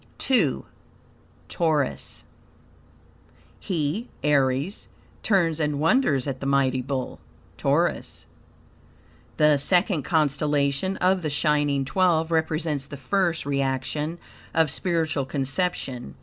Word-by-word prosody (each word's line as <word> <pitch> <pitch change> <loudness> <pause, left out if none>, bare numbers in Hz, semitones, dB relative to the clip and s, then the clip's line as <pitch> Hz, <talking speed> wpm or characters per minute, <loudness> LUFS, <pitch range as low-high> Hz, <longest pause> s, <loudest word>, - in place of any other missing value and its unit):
II. 185 - +2 0.8
Taurus 155 -5 -1 1.4
"He 175 +6 -2
(Aries) 140 +4 +1 0.3
turns 170 -6 +2
and 150 -2 0
wonders 155 - +2
at 135 -2 -4
the 135 - -4
mighty 135 -2 +2
Bull 130 0 -4 0.4
(Taurus)." - - -1 1.1
The 150 -1 +5
second 175 +3 +2
constellation 150 +3 0
of 185 0 +2
the 155 - -2
shining 145 -2 +1
twelve 170 0 +2
represents 155 -3 -1
the 145 - -8
first 170 +4 0
reaction 140 +3 -1 0.4
of 160 -3 +3
spiritual 160 -6 -1
conception. 135 - -2
150 Hz, 95 wpm, -25 LUFS, 140-170 Hz, 1.4 s, The